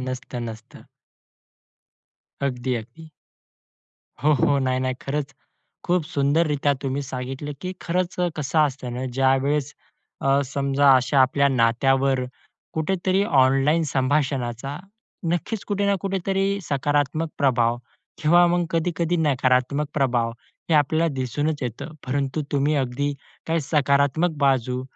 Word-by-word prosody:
नसतं, 125 -1 -5
नसतं. 110 0 -11 1.6
अगदी, 130 -2 -1
अगदी. 160 +8 -10 1.1
हो, 150 +1 +4
हो. 140 +1 +3
नाही, 130 -1 0
नाही. 130 0 -1
खरंच 140 0 -3 0.5
खूप 180 0 +1
सुंदररित्या 145 -2 +1
तुम्ही 135 +1 -2
सांगितलं, 135 +2 -5
की 185 0 -4
खरंच 180 +1 -1
अ, 175 - +2
कसं 150 +1 -1
असतं 130 -3 -6
ना 125 +1 -3
ज्यावेळेस 135 +2 +1 0.5
अ, 135 +1 +3
समजा 140 +1 +3
अशा 130 +2 +2
आपल्या 140 +2 +4
नात्यावर 130 +2 +2 0.5
कुठेतरी 185 +4 0
ऑनलाईन 135 +1 +3
संभाषणाचा 135 -1 -1 0.6
नक्कीच 205 +5 -3
कुठे 200 -1 -1
ना 200 - +3
कुठेतरी 195 +1 -1
सकारात्मक 145 +2 0
प्रभाव 120 -4 +2 0.5
किंवा 175 +3 +6
मग 175 0 +1
कधी-कधी 170 +1 0
नकारात्मक 135 -1 +1
प्रभाव 120 -5 +1 0.4
हे - - +4
आपल्याला 155 +3 +3
दिसूनच 145 +3 -2
येतं. 125 +6 -5
परंतु 140 +3 -1
तुम्ही 145 +2 +2
अगदी 140 +2 -1 0.3
काही 165 0 +1
सकारात्मक 145 +3 +2
बाजू 130 -1 +1
140 Hz, 120 wpm, -23 LUFS, 130-160 Hz, 1.6 s, किंवा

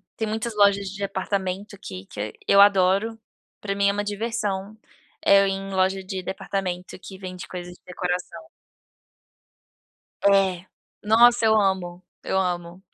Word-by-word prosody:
tem 220 - -2
muitas 220 +1 -3
lojas 200 -1 +4
de 200 +1 -9
departamento 195 0 -3
que 95 0 -8
que 105 +2 -6 0.2
eu 200 - +7
adoro, 200 +3 +4 0.4
pra 200 -1 -3
mim 200 0 +2
é - - +3
uma 205 +1 -2
diversão, 210 -1 -3 0.5
é 200 0 +7
eu 200 - +2
ir 195 - 0
em 195 0 -5
loja 190 0 +1
de 185 0 -5
departamento 185 -1 -4
que 190 - -10
vende 185 -1 -8
coisas 180 -1 -7
de - - -22
decoração. 180 -2 -4 1.7
É, 190 -2 +3 0.4
nossa 230 +2 +5
eu 220 0 +5
amo, 185 -3 -1 0.2
eu 190 - -1
amo, 175 0 -3
195 Hz, 150 wpm, -24 LUFS, 180-205 Hz, 1.7 s, eu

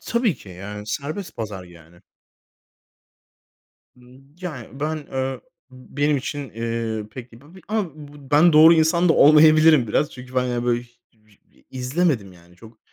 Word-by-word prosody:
Tabii 235 - 0
ki, 95 - -16
yani, 105 +3 -9
serbest 155 - -5
pazar 100 -5 -6
yani. 85 0 -18 1.9
Imm, 125 +1 -19 0.2
yani, 135 -7 -8
ben, 155 -1 -3
ööö, 130 0 -3 0.3
benim 145 +3 -2
için, 140 -1 -5
eee, 115 -1 -4
pek 125 0 -11
b 145 +9 -17
bir, 190 - -15
a, 215 -2 0
bu 145 -2 -14
ben 155 +4 +5
doğru 160 +2 +8
insan 165 +2 +2
da 160 - +5
olmayabilirim 155 -2 +6
biraz. 145 +7 -1
Çünkü 125 0 -12
ben, 125 - +1
yani, 120 -1 -2
böyle, 120 0 0
h - - -17 0.3
vi 110 -2 -30
izlemedim, 130 - -1
yani. 90 0 -20
Çok, 110 +2 -16
130 Hz, 155 wpm, -22 LUFS, 115-155 Hz, 1.9 s, doğru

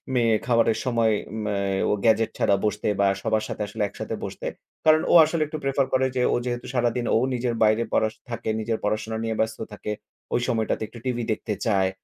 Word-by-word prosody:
মে 120 - +3 0.2
খাবারের 115 -2 +3
সময় 115 -3 +2 0.3
ম্যা 105 -1 -1 0.3
ও - - +2
গ্যাজেট 115 0 +3
ছাড়া 100 - +3
বসতে 105 0 -1
বা 100 - +4
সবার 110 0 +1
সাথে - - -5
আসলে 105 +2 -6
একসাথে 100 - -5
বসতে। - - -5 0.4
কারণ 155 0 +6
ও - - +4
আসলে 160 0 -2
একটু 155 - -5
প্রেফার 135 0 +1
করে 130 0 +3
যে 125 - +1
ও - - +3
যেহেতু 120 0 -3
সারাদিন 120 -1 0
ও - - +5 0.2
নিজের 120 -1 -1
বাইরে 110 +2 +4
পড়া 110 - +3
সু - - -28
থাকে, 115 -1 -3
নিজের 110 0 -1
পড়াশোনা 110 +2 -1
নিয়ে 115 0 -1
ব্যস্ত 110 0 0
থাকে। 105 +1 -5 0.4
ওই 120 - +2
সময়টাতে 110 -3 0
একটু 115 - -12
টিভি 120 -2 -1
দেখতে 110 0 -2
চায় 95 -4 +2
115 Hz, 205 wpm, -25 LUFS, 110-120 Hz, 0.4 s, কারণ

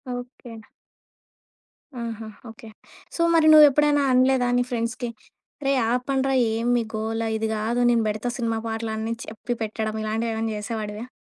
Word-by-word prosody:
Okay. 245 0 -9 1.5
ఆహా! 225 -1 -6 0.2
Okay. 225 0 -12 0.5
So - - -2
మరి 320 -1 +5
నువ్వెప్పుడైనా 295 -1 +6
అనలేదా 255 0 +3
నీ 245 - +3
ఫ్రెండ్స్‌కి 235 +1 -2 0.6
"రేయ్ 275 -1 +2
ఆపండ్రా! 270 +2 0 0.2
ఏమి 230 +2 -1
మీ 235 - 0
గోల 220 +1 -2 0.2
ఇది 220 0 -1
కాదు. 220 +3 -1
నేను 230 -1 +2
పెడతా 215 +3 -3
సినిమా 230 -2 -1
పాటలు," 225 0 -3
అని 220 +1 -2
చెప్పి 225 +3 -5
పెట్టడం 215 0 -3
ఇలాంటివేమైనా 225 +1 -2
చేసేవాడివా? 215 +1 -5
230 Hz, 135 wpm, -24 LUFS, 220-250 Hz, 1.5 s, నువ్వెప్పుడైనా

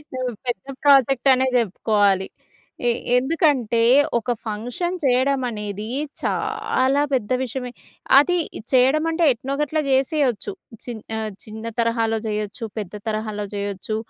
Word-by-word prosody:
హ్మ్. 255 -1 -2
పెద్ద 235 -6 -2 0.2
ప్రాజెక్టనే 270 -1 +4
జెప్పుకోవాలి. 205 -3 +2 0.6
ఎ - - +5 0.3
ఎందుకంటే 260 - +2 0.3
ఒక 235 +1 -2 0.2
ఫంక్షన్ 245 +12 -3
చేయడమనేది 245 -6 0 0.3
చాలా 270 +3 0
పెద్ద 215 -6 0
విషమే 250 0 -4 0.5
అది 325 +6 +5 0.2
ఇది - - -7
చేయడం 265 +4 +4
అంటే, 330 +1 0
ఎట్నో‌ 255 +4 -5
గట్ల 300 +1 0
జేసేయొచ్చు. 270 - +1 0.3
చి 245 - -5 0.3
ఆహ్, 220 -1 -3
చిన్న 220 +1 -7
తరహాలో 230 -1 +1
జేయొచ్చు, 210 +1 -3
పెద్ద 205 -3 -5
తరహాలో 215 -1 -2
జేయొచ్చు 200 +1 -3
245 Hz, 115 wpm, -22 LUFS, 215-270 Hz, 0.6 s, ఎ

